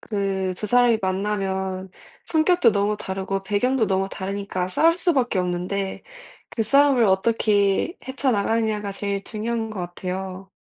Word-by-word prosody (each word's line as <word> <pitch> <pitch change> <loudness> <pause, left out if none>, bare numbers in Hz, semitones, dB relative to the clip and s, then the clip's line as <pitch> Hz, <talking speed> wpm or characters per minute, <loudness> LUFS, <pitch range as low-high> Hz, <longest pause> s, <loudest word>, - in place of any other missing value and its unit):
그 195 -3 -2
2 210 - -3
사람이 245 0 +4
만나면 190 -1 -2 0.4
성격도 330 -4 +3
너무 205 +1 +1
다르고 195 0 -3
배경도 220 +4 +1
너무 195 0 0
다르니까 195 -1 -3
싸울 330 - +3
수밖에 265 - +1
없는데 185 +2 -2 0.5
그 225 - -1
싸움을 275 +1 +4
어떻게 205 - +2
헤쳐 265 0 0
나가느냐가 215 -1 0
제일 200 0 -3
중요한 225 0 -3
것 215 - -7
같아요. 185 +2 -6
200 Hz, 310 characters per minute, -23 LUFS, 190-230 Hz, 0.5 s, 사람이